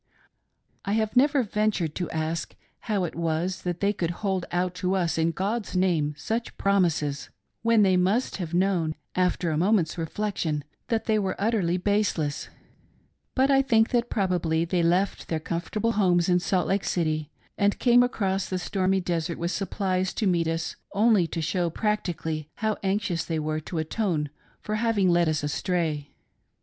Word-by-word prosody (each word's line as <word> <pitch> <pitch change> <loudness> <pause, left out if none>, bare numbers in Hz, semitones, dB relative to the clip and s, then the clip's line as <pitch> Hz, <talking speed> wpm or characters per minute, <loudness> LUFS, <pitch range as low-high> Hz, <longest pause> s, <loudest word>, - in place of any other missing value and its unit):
I 200 - -1
have 220 +1 0
never 280 +1 +4
ventured 210 -7 0
to 175 - -3
ask 160 0 -3 0.3
how 205 -3 +1
it 175 - -3
was 170 +3 -1
that 175 -1 -3
they 200 +1 +2
could 170 -4 -2 0.2
hold 190 -2 0
out 180 0 0
to 185 +1 +1
us 175 -3 0
in 160 +1 +3
God's 200 +5 -2
name 165 -5 +1
such 230 +6 -3
promises, 170 -8 +1 0.3
when 230 -2 +4
they 190 -2 +4
must 195 +8 +1
have 175 -5 -4
known, 175 -3 +1 0.2
after 180 -2 +1
a 155 - 0
moment's 180 -3 +2
reflection, 165 -3 -2 0.2
that 225 -2 -1
they 215 -1 +2
were 190 -2 -1
utterly 200 -5 +1
baseless, 185 -7 0 0.9
but 270 +1 +3
I 270 0 +5
think 225 -4 +3
that 240 -1 +1
probably 175 -5 +1
they 175 +1 0
left 180 +4 +1
their 160 - -1
comfortable 175 +8 -2
homes 180 -5 +2
in 180 0 +4
Salt 180 0 0
Lake 195 0 +1
City 155 -3 -1 0.3
and 200 0 +2
came 245 -1 +5
across 195 -6 0
the 185 - -1
stormy 190 +1 0
desert 170 -1 -2
with 170 +1 -2
supplies 190 -2 -1
to 220 - 0
meet 170 -4 +2
us, 165 0 -2 0.2
only 205 -4 +4
to 165 0 -3
show 170 +2 0
practically 160 -6 -2
how 220 -1 0
anxious 190 -3 0
they 165 - -2
were 155 0 -1
to 160 +2 -6
atone 160 -2 -1 0.3
for 215 0 -2
having 215 -4 +2
led 170 -1 +3
us 155 -1 -1
astray. 150 -1 -1
185 Hz, 170 wpm, -26 LUFS, 165-205 Hz, 0.9 s, I